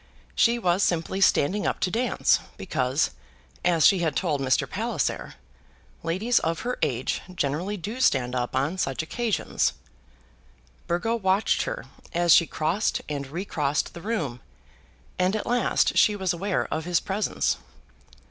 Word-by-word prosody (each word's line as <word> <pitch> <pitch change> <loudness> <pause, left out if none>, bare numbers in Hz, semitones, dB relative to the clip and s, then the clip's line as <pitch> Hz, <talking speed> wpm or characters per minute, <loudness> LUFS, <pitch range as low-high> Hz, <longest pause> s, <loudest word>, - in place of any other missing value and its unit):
She 235 +1 +3
was 185 -4 +1
simply 180 +2 0
standing 195 +2 +3
up - - -1
to 180 - +1
dance, 245 +6 +2 0.2
because, 135 -5 0 0.5
as 165 -4 +3
she 195 - +6
had 160 -5 0
told 155 -5 0
Mr. 130 -1 +2
Palliser, 215 - -2 0.7
ladies 195 +9 +1
of 165 0 -2
her 250 +1 -3
age 125 0 -1
generally 170 +7 -1
do 215 +8 -5
stand 125 - +2
up 125 0 -2
on 145 +8 0
such 135 -2 -1
occasions. 230 +6 0 1.1
Burgo 200 +7 0
watched 195 -1 +1
her - - -4 0.3
as 175 -1 +5
she 170 - +6
crossed 170 +8 0
and 140 -2 -4
re 170 +8 -5
crossed 145 -5 -1
the 170 - -9
room, 165 - -2 0.8
and 185 +3 +2
at 215 - -2
last 245 0 +2
she 210 - +5
was 190 -3 0
aware 190 +2 -1
of 160 0 -3
his 175 -1 +2
presence. 200 +2 -1
175 Hz, 150 wpm, -26 LUFS, 150-205 Hz, 1.1 s, she